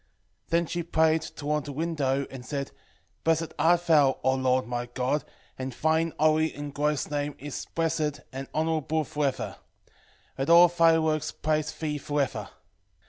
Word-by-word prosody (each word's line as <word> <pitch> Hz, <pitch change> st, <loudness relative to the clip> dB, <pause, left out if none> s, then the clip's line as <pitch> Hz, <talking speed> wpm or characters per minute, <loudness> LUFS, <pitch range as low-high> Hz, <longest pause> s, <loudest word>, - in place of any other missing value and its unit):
3:11 -, -, -35 dB
Then 170 Hz, +1 st, +2 dB
she 175 Hz, +2 st, -3 dB
prayed 160 Hz, -1 st, +2 dB
toward 150 Hz, -1 st, -3 dB
the 145 Hz, -, -5 dB
window, 140 Hz, -3 st, -1 dB
and 130 Hz, -2 st, -8 dB
said, 140 Hz, 0 st, -4 dB, 0.5 s
Blessed 165 Hz, 0 st, +1 dB
art 170 Hz, +3 st, +3 dB
thou, 145 Hz, -5 st, +4 dB
O 130 Hz, +1 st, +3 dB
Lord 130 Hz, -1 st, +1 dB
my 120 Hz, 0 st, -3 dB
God, 130 Hz, +4 st, -1 dB, 0.4 s
and 130 Hz, 0 st, -4 dB
thine 160 Hz, +4 st, +1 dB
holy 155 Hz, +1 st, +3 dB
and 145 Hz, -1 st, -6 dB
glorious 150 Hz, 0 st, -1 dB
name 145 Hz, 0 st, -2 dB
is 145 Hz, -1 st, -6 dB
blessed 155 Hz, -4 st, 0 dB
and 135 Hz, +1 st, -5 dB
honourable 160 Hz, 0 st, 0 dB
for 150 Hz, 0 st, -1 dB
ever: 135 Hz, -, -4 dB, 0.8 s
let 135 Hz, -, -1 dB
all 170 Hz, +1 st, +8 dB
thy 165 Hz, -1 st, +4 dB
works 155 Hz, -1 st, 0 dB
praise 155 Hz, -1 st, -1 dB
thee 150 Hz, -2 st, -3 dB
for 145 Hz, +1 st, -2 dB
ever. 140 Hz, -, -1 dB
150 Hz, 165 wpm, -27 LUFS, 140-160 Hz, 0.8 s, all